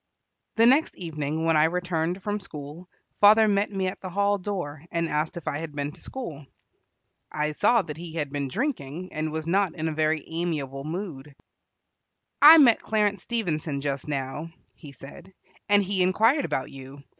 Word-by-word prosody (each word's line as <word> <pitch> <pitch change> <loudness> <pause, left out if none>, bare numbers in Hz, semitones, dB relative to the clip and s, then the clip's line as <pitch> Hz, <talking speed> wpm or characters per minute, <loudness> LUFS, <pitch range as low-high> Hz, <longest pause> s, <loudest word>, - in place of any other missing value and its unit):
The 225 - +5
next 270 +6 +4
evening, 160 -2 -3
when 165 -1 +3
I 150 0 +5
returned 175 +1 -2
from 210 0 -2
school, 160 -1 -9 0.3
father 215 +2 +7
met 200 0 +1
me 195 -1 -2
at 185 - -4
the 185 - -6
hall 200 +2 +1
door, 175 -7 -5
and 170 -1 -1
asked 155 +3 -2
if 170 - -9
I 145 - -1
had 160 -2 -7
been 145 0 -3
to - - -14
school. 155 - -7 0.8
I 150 0 -1
saw 235 +10 +3
that 150 -2 -7
he 170 -1 -8
had 150 -4 -3
been 140 -1 -2
drinking, 185 - -4
and 155 0 -2
was 160 0 -4
not 185 0 +1
in 160 -1 -3
a - - -1
very 155 0 0
amiable 150 -5 -3
mood. 155 -5 -6 1.1
"I 310 +3 +11
met 255 -7 +6
Clarence 210 -3 0
Stevenson 160 -11 -2
just 140 0 -3
now," 140 +2 -4 0.2
he 145 - -12
said, 140 +8 -12 0.3
"and 205 0 +5
he 190 0 -1
inquired 225 +10 +3
about 130 - -3
you. 135 +1 -11
165 Hz, 180 wpm, -26 LUFS, 150-200 Hz, 1.1 s, I